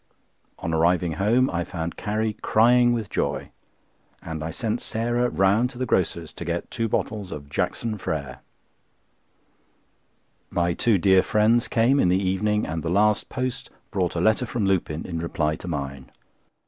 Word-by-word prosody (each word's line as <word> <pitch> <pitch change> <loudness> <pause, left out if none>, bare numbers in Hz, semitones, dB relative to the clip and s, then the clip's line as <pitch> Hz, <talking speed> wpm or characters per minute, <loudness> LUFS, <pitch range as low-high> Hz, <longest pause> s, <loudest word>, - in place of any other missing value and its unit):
On 80 - -3
arriving 85 +1 +2
home 110 +9 +2
I 85 0 -1
found 85 -2 -5
Carrie 110 +1 -1
crying 120 +2 +4
with 115 -3 -1
joy, - - -2 0.7
and 80 -2 -6
I 80 - -3
sent 110 +7 -2
Sarah 120 +2 0
round 100 +6 +2
to 125 - -12
the 130 - -1
grocer's 85 -6 -1
to - - -7
get 85 +1 -3
two 115 -2 -1
bottles 105 -3 -2
of 70 -1 -7
"Jackson 105 +7 -2
Frères." 75 -5 -4 2.1
My 85 0 +1
two 110 +4 +2
dear 95 +1 +5
friends 110 +4 +2
came 125 +4 +3
in 90 - +3
the 90 - +3
evening, 100 +3 0
and 80 0 -3
the 80 - -3
last 105 +3 +2
post 130 -1 -3 0.2
brought 90 -4 -1
a - - 0
letter 110 +5 +2
from 115 -3 -1
Lupin 85 -5 0
in 85 -2 -4
reply 80 -2 -1
to - - -10
mine. 70 -5 -5
95 Hz, 160 wpm, -24 LUFS, 85-115 Hz, 2.1 s, dear